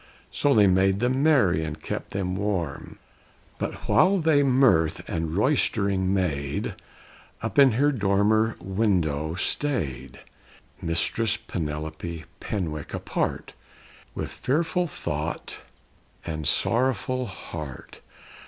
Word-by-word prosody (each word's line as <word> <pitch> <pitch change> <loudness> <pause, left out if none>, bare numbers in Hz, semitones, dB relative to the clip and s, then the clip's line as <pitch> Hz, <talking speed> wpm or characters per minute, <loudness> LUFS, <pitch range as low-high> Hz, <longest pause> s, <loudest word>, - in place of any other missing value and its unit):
So 145 -1 +2
they 105 -2 +6
made 95 +1 +3
them 125 +3 +1
merry 120 - +4
and 80 0 -5
kept - - -5
them 95 -2 -2
warm. 95 -7 -3 0.6
But - - -4
while 195 +2 +4
they 160 -4 +3
mirth 130 - +3
and 80 -1 -2
roistering 100 -6 +2
made, 75 -8 -1 0.7
Up - - 0
in 135 -4 +7
her 145 +6 +3
dormer 110 0 +2
window 85 -6 0
stayed 75 - -2 0.6
Mistress 105 +7 0
Penelope 80 -1 -5
Penwick 80 -8 -4
apart, - - -3 0.6
With - - -4
fearful 165 +5 0
thought - - -4 0.6
and 80 -3 -3
sorrowful 130 +1 +1
heart. 75 -8 -8
95 Hz, 105 wpm, -25 LUFS, 80-130 Hz, 0.7 s, in